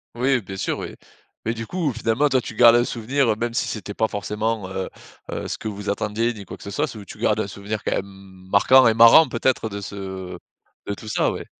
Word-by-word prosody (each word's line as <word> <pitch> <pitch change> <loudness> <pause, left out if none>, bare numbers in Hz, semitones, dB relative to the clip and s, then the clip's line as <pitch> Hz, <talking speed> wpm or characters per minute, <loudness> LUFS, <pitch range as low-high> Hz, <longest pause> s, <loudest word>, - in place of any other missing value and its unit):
Oui 125 +1 +2
bien 95 -1 -8
sûr - - -2
oui. - - -6 0.5
Mais 115 - 0
du 115 -1 -6
coup, 170 -7 -1
finalement 115 +5 +1
toi 130 -2 +2
tu 115 - -8
gardes 120 0 +7
un 120 - +4
souvenir 125 +3 0
heu, - - 0
même 115 +2 -3
si - - 0
c'était 105 -2 -5
pas 110 - +1
forcément, 105 0 -2
heu, 95 0 -4 0.4
heu, - - -4
ce - - -4
que - - -5
vous 105 0 -5
attendiez 110 +3 -1
ni 100 -3 -10
quoi - - -9
que - - -14
ce 100 - -7
soit, 150 +8 0
c'est 115 - -9
où 100 - -10
tu - - -12
gardes 105 0 +1
un 110 - -1
souvenir 100 +2 -5
quand - - -1
même 95 -1 -8
marquant 130 +6 +6
et 115 - +4
marrant 115 +7 +8
peut-être 120 -1 0
de 100 -1 -6
ce 95 -2 -7 0.5
de 100 - -1
tout 110 - -12
ça 110 - +1
ouais? - - -6
110 Hz, 250 wpm, -22 LUFS, 100-120 Hz, 0.5 s, marrant